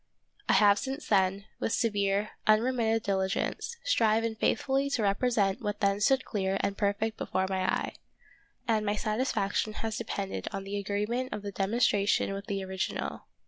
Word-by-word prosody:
I - - +6
have 205 -1 +6
since 270 +3 -4
then, 195 0 +2
with - - -1
severe, 205 -2 +1 0.2
unremitted 225 0 +3
diligence, 195 - -1
striven 225 - +2
faith 220 - +1
fully 275 0 +1
to 250 -5 0
represent 200 -1 +1
what 210 -2 -3
then 200 -1 +1
stood 265 +4 +3
clear 195 -2 -1
and 200 - -1
perfect 210 +2 0
before 190 0 0
my 190 -1 0
eye, - - -2 0.7
and 220 -2 +2
my 205 0 0
satisfaction 215 -1 0
has 220 0 -3
depended 200 -4 -4
on 195 -2 -4
the 200 +1 -3
agreement 210 +6 -2
of 210 - -5
the 200 - -4
demonstration 200 0 +2
with 200 +1 -6
the 195 -3 -2
original. 190 0 -4
210 Hz, 160 wpm, -29 LUFS, 195-225 Hz, 0.7 s, I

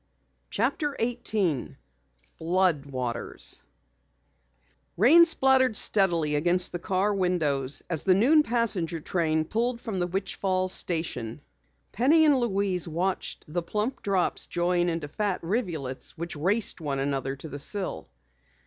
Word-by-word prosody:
CHAPTER 295 -5 -1
18 215 - -2 0.6
FLOOD 170 -4 0
WATERS 125 -3 -3 1.4
Rain 300 - +7
splattered 265 -7 +4
steadily 170 -7 +3
against 175 +4 +3
the 175 - -5
car 190 +4 0
windows 155 -8 0
as 165 -4 -2
the 185 -2 +3
noon 275 +10 +4
passenger 215 - +1
train 160 -1 -1
pulled 235 +6 -2
from 220 -6 -5
the 175 - -1
Witch 190 +2 -4
Falls 185 -1 0
station. 150 -9 -2 0.5
Penny 305 +8 +3
and 295 -2 +5
Louise 200 -7 0
watched 180 +4 -3
the 170 +3 -3
plump 210 +9 -3
drops 195 -3 -1
join 175 0 0
into 165 -3 -3
fat 200 +5 -2
rivulets 165 - -4
which 170 +1 -6
raced 190 +5 +1
one 145 -3 -3
another 135 -1 -2
to 140 +4 -9
the 145 -1 -7
sill. 185 - -3
180 Hz, 130 wpm, -26 LUFS, 155-215 Hz, 1.4 s, Rain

